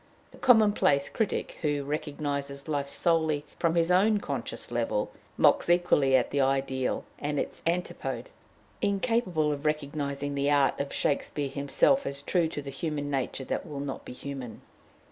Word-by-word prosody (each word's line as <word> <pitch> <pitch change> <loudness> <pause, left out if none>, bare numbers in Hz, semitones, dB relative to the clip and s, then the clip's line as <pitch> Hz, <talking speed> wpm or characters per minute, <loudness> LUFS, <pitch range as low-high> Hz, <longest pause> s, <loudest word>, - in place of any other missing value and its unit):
The - - -16
commonplace 210 - +4
critic, 220 -3 -2
who 145 -2 0
recognizes 140 -1 -3
life 140 -2 -1
solely 160 -3 +1
upon 170 -1 +2
his 170 +1 +3
own 205 +4 +4
conscious - - -5
level, - - -1 0.3
mocks - - +4
equally 175 -6 +4
at 125 - +2
the 140 - +2
ideal 135 -1 0 0.2
and 145 -1 -1
its - - -4
antipode, 180 - -2 0.5
incapable 200 -7 +1
of 145 -1 -4
recognizing 145 -2 -2
the 140 0 +1
art 140 -2 +3
of 140 - -2
Shakespeare 145 0 -1
himself 140 - +2
as 140 0 -4
true 170 +1 +2
to 150 -2 -5
the 140 - -6
human 145 0 -3
nature 135 0 -2
that 180 - -3
will 145 -3 -6
not 140 -1 -4
be - - -8
human. 130 -4 -7
145 Hz, 155 wpm, -28 LUFS, 140-170 Hz, 0.5 s, commonplace